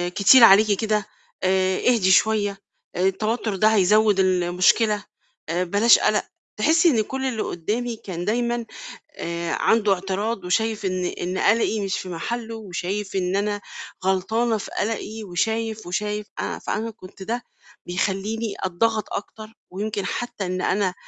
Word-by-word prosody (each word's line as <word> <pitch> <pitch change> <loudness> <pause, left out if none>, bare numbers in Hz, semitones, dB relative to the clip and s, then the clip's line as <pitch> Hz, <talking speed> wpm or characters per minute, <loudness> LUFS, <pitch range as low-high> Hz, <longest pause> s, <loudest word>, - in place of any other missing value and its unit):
كتير 235 +5 +7
عليكِ 215 0 +7
كده، 215 -2 0 0.4
آآ 185 0 +2
اهدي 220 -7 +3
شوية، 205 0 +3 0.4
آآ 180 - -2
التوتر 215 +2 -1
ده 215 +3 +3
هيزوّد 210 +1 +4
المشكلة، 185 +4 +2 0.5
آآ 175 +2 0
بلاش 205 +6 +5
قلق. - - +2 0.4
تحسي 330 +2 +4
إن 235 -8 +2
كل 265 +5 -4
اللي 240 -5 -2
قدّامي 230 +8 -3
كان 180 -5 -6
دايمًا 235 +2 -1 0.5
آآ 170 0 -4
عنده 215 -3 +3
اعتراض، 195 +2 -3
وشايف 215 +3 0
إن 185 -1 -1
إن 180 +1 -3
قلقي 220 +1 +2
مش 195 - -1
في 185 - -7
محله، 225 +7 -4
وشايف 195 -1 -4
إن 185 0 0
أنا 205 0 -1 0.4
غلطانة 220 +5 +1
في 205 - -8
قلقي، 220 0 -3
وشايف، 220 +3 -2
وشايف 210 +3 -3
أنا - - -3
فأنا 225 +2 -3
كنت 195 -3 -12
ده 235 +4 -3 0.4
بيخلّيني 200 +5 -2
أتضغط 215 +4 0
أكتر، 215 +2 -7 0.2
ويمكن 205 +1 -3
حتى 240 -1 -4
إن 185 0 -3
أنا 190 -1 0
210 Hz, 140 wpm, -23 LUFS, 185-225 Hz, 0.5 s, كتير